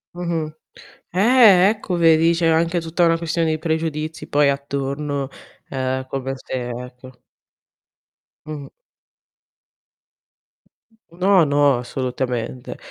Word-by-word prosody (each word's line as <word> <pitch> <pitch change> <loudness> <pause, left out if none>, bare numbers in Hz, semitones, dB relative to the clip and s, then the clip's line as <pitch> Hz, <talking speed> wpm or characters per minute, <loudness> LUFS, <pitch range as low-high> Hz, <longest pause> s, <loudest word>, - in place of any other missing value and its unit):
Mh-mh. 165 -3 -3 0.6
Eh, 200 -1 +6
ecco 210 -4 -3
vedi 165 0 +4
c'è 170 0 +1
anche 165 +2 +2
tutta 165 +2 +1
una 165 0 +3
questione 165 0 -1
di 155 - 0
pregiudizi 160 -1 -3
poi 145 -1 +3
attorno, 140 0 -3 0.4
ehm 130 0 -2
come 135 0 -4
se 130 - -10 0.2
ecco. 125 +1 -10 1.3
Mh-mh. 150 -2 -7 2.4
No, 185 0 +3
no, 145 -2 +3
assolutamente. 125 -1 -4
155 Hz, 100 wpm, -21 LUFS, 135-170 Hz, 2.4 s, Eh